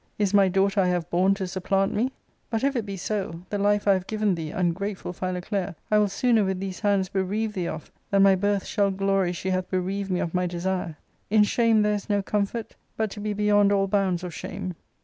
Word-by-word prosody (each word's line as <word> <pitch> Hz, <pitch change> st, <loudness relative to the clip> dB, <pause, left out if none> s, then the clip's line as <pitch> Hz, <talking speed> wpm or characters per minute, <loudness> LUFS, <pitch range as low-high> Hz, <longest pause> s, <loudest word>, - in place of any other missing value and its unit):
Is 205 Hz, -2 st, 0 dB
iny 195 Hz, -2 st, +5 dB
daughter 195 Hz, +1 st, +2 dB
I 185 Hz, -, +2 dB
have 175 Hz, -2 st, -1 dB
borne 185 Hz, +3 st, +3 dB
to 195 Hz, -1 st, -3 dB
supplant 195 Hz, +1 st, 0 dB
me? 240 Hz, +5 st, +1 dB, 0.4 s
But, 225 Hz, 0 st, -2 dB
if 275 Hz, 0 st, +1 dB
it 225 Hz, -4 st, -2 dB
be 195 Hz, -1 st, -5 dB
so, 185 Hz, -3 st, -3 dB
the 205 Hz, -, -1 dB
life 205 Hz, +1 st, +2 dB
I 200 Hz, -, +7 dB
have 185 Hz, -1 st, -2 dB
given 215 Hz, -2 st, +1 dB
thee, 165 Hz, -3 st, -4 dB
ungrateful 180 Hz, +2 st, -2 dB
Philoclea, 185 Hz, +1 st, -3 dB, 0.2 s
I 210 Hz, -, +5 dB
will 210 Hz, -, +3 dB
sooner 225 Hz, +2 st, +2 dB
with 190 Hz, -1 st, -1 dB
these 190 Hz, -1 st, -5 dB
hands 200 Hz, -3 st, +2 dB
bereave 200 Hz, +4 st, -1 dB
thee 180 Hz, -3 st, -2 dB
of, 155 Hz, -, -6 dB, 0.2 s
than 195 Hz, -1 st, +4 dB
my 195 Hz, -1 st, +7 dB
birth 200 Hz, +1 st, 0 dB
shall 200 Hz, -2 st, +1 dB
glory 195 Hz, -1 st, +1 dB
she 185 Hz, +2 st, -3 dB
hath 185 Hz, 0 st, -1 dB
bereaved 190 Hz, +2 st, -2 dB
me 180 Hz, -1 st, 0 dB
of 165 Hz, -, -2 dB
my 180 Hz, 0 st, +1 dB
desire. 175 Hz, -2 st, -3 dB, 0.3 s
In 210 Hz, 0 st, +5 dB
shame 225 Hz, 0 st, +3 dB
there 210 Hz, 0 st, +2 dB
is 205 Hz, 0 st, -4 dB
no 205 Hz, -1 st, +2 dB
• -, -, -16 dB
comfort 210 Hz, +2 st, -2 dB, 0.2 s
but 220 Hz, -2 st, -1 dB
to 210 Hz, -, -8 dB
be 210 Hz, 0 st, -2 dB
beyond 205 Hz, -1 st, +3 dB
all 195 Hz, -1 st, +3 dB
bounds 190 Hz, -3 st, +1 dB
of 180 Hz, -2 st, -5 dB
shame." 185 Hz, -1 st, -5 dB
195 Hz, 230 wpm, -25 LUFS, 185-205 Hz, 0.4 s, I